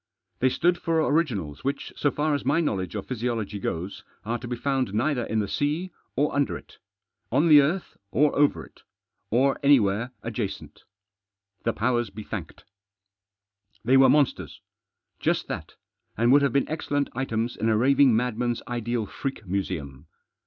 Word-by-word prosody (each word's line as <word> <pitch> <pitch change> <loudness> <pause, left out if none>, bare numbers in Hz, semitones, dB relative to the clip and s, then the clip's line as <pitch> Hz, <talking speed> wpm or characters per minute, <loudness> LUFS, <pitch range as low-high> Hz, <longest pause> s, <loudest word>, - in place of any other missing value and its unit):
They 130 - +3
stood 175 +6 +1
for 165 -1 0
originals 105 - -1
which, 140 +1 -3
so 145 - +1
far 150 +2 0
as 145 - -1
my - - +2
knowledge 95 - -1
of 100 - -4
physiology 115 -4 -3
goes, 90 +1 -4 0.2
are 115 +2 -2
to 120 - -7
be 120 - -2
found 130 -4 -1
neither 125 +2 +1
in 110 - -2
the 105 -2 0
sea, 150 - -1 0.2
or 145 +3 +1
under 140 -1 +1
it; - - -17 0.5
on 145 +7 +3
the 150 -2 +9
earth, 170 +7 -2
or 145 +7 +2
over 115 - +2
it; - - -21 0.5
or 135 +4 +2
anywhere 120 -5 +3
adjacent. 110 -3 -5 0.8
The 115 - +1
powers 120 0 0
be 105 +2 -9
thanked! - - -7 1.2
They 130 +3 +4
were 135 0 +7
monsters; 145 0 +1 0.6
just - - 0
that, - - -6 0.4
and 120 +2 +3
would 145 +2 +7
have 140 - +1
been 140 - +2
excellent 145 -2 -2
items 120 -2 -2
in 115 - 0
a 110 - +3
raving 135 +1 +5
madman's 120 0 -1
ideal 120 -2 -2
freak 135 0 -5
museum. 85 -7 -4
125 Hz, 160 wpm, -26 LUFS, 110-140 Hz, 1.2 s, the